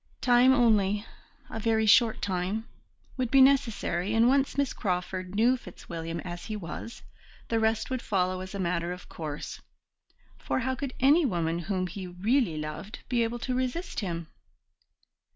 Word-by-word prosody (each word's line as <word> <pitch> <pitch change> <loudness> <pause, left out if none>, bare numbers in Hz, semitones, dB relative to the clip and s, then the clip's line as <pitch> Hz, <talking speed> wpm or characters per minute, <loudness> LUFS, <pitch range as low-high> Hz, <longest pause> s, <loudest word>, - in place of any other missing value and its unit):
Time 245 +1 +5
only 210 -5 +3 0.5
a 225 - -4
very 220 0 +2
short 225 +1 +5
time 195 +4 -2 0.5
would 255 -2 -1
be 270 - +5
necessary, 230 -8 +3
and 225 +1 +5
once 270 +1 +2
Miss 280 -2 +1
Crawford 185 -1 -3
knew 235 +4 +4
Fitzwilliam 170 -6 -7
as 175 -1 -7
he 215 - -4
was, 210 +4 -7 0.5
the 230 - +1
rest 220 +3 0
would 255 -2 -1
follow 185 -3 0
as 185 +2 -7
a - - -4
matter 175 -1 -1
of 180 - -11
course: 150 -3 -6 0.8
for - - -1
how 260 +1 0
could 270 0 -5
any 290 +6 +5
woman 170 - 0
whom 185 +1 -2
he 185 +1 -6
really 195 - +1
loved 155 +7 -6
be 245 -2 +2
able 230 +1 -2
to 255 +2 -3
resist 255 +8 -2
him? 170 -5 -3
215 Hz, 160 wpm, -28 LUFS, 180-245 Hz, 0.8 s, Time